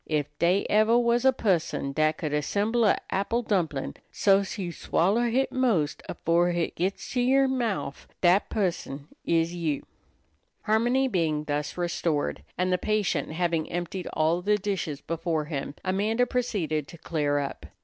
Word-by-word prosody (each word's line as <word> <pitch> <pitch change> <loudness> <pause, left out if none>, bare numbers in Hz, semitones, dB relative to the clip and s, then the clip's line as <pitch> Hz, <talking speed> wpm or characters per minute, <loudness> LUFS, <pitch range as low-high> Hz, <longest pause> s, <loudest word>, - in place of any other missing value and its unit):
Ef 150 -2 +1
dey 180 +4 +3
ever 215 +3 +4
was 240 +1 +2
a 265 - +7
pusson 175 - 0
dat 155 +1 +2
could 150 -2 -3
assemble 205 +10 +1
a' 205 - +4
apple 230 +5 0
dumplin' 170 -10 -1 0.2
so's 195 +1 +2
you 180 -4 -3
swoller 205 +8 +1
hit 260 +4 +1
'most 225 - +1
afore 170 +2 +2
hit 175 -1 -1
gits 185 +3 -2
to 250 - +1
yer 270 +2 +4
mouf, 225 - -2
dat 180 +3 +4
pusson 170 -8 -2 0.2
is 165 0 +1
you." 160 -5 -2 0.8
Harmony 240 +5 +2
being 160 -9 0
thus 150 +1 -3
restored, 170 -3 -1 0.2
and 185 0 +1
the 180 - +1
patient 215 -6 0
having 165 -2 -1
emptied 175 +1 -4
all 160 +3 +2
the 210 +3 +2
dishes 190 -8 -3
before 165 -1 -2
him, 145 -2 -4
Amanda 210 +6 +1
proceeded 185 - -1
to 170 - -11
clear 150 -3 -1
up. 140 -1 -4
180 Hz, 155 wpm, -27 LUFS, 155-215 Hz, 0.8 s, a